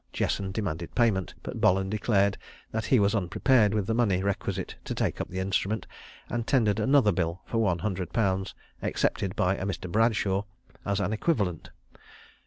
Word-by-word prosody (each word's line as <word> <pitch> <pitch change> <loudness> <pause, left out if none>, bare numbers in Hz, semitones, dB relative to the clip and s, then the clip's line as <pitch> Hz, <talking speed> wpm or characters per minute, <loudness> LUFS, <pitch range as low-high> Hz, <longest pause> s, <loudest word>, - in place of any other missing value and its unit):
Jesson 95 -1 -1
demanded 90 -5 -4
payment; 105 -7 +1
but - - -6
Bolland 95 +1 +3
declared 100 -2 +2 0.4
that 110 -1 -2
he 130 - +4
was 100 +1 +3
unprepared 105 +2 +3
with 105 -3 0
the 115 - 0
money 100 -6 +2
requisite 100 -1 -2
to - - -3
take - - -1
up - - -5
the 95 - -6
instrument, 100 +3 -1 0.4
and 120 -1 -3
tendered 110 -6 +2
another 130 -1 +4
bill 85 0 -2
for 115 - -1
one 95 -6 +2
hundred 90 -1 -3
pounds, 95 -3 0 0.3
accepted 95 -1 -1
by 90 +2 +2
a 95 - -5
Mr. 95 -2 -4
Bradshaw, 105 -2 +2 0.4
as 100 0 +1
an 100 +1 0
equivalent. 105 - -1
100 Hz, 170 wpm, -28 LUFS, 95-110 Hz, 0.4 s, he